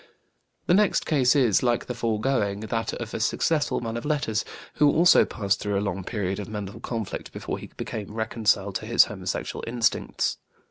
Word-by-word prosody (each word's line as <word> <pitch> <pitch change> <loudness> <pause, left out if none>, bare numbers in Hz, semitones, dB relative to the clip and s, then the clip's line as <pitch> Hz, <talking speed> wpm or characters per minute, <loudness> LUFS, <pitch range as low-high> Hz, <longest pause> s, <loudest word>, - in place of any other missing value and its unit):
The - - +3
next 205 +2 +3
case 135 -4 +3
is, 125 -8 +4
like 120 -2 +1
the 125 - -4
foregoing, 110 -3 0
that 115 +1 -2
of - - -6
a - - -2
successful 155 -5 +1
man 115 -1 -3
of 120 - -5
letters 140 -8 0 0.3
who 150 - +5
also 170 +4 +6
passed 100 -3 -1
through 100 -1 -1
a 100 +1 -1
long 95 0 -3
period 95 -2 -2
of 105 - -6
mental 105 -2 -6
conflict 115 -4 -5
before - - -5
he - - -10
became 105 -2 -5
reconciled 110 -3 +1
to - - -9
his - - +6
homosexual - - -4
instincts. 120 +1 0
115 Hz, 180 wpm, -25 LUFS, 105-125 Hz, 0.3 s, also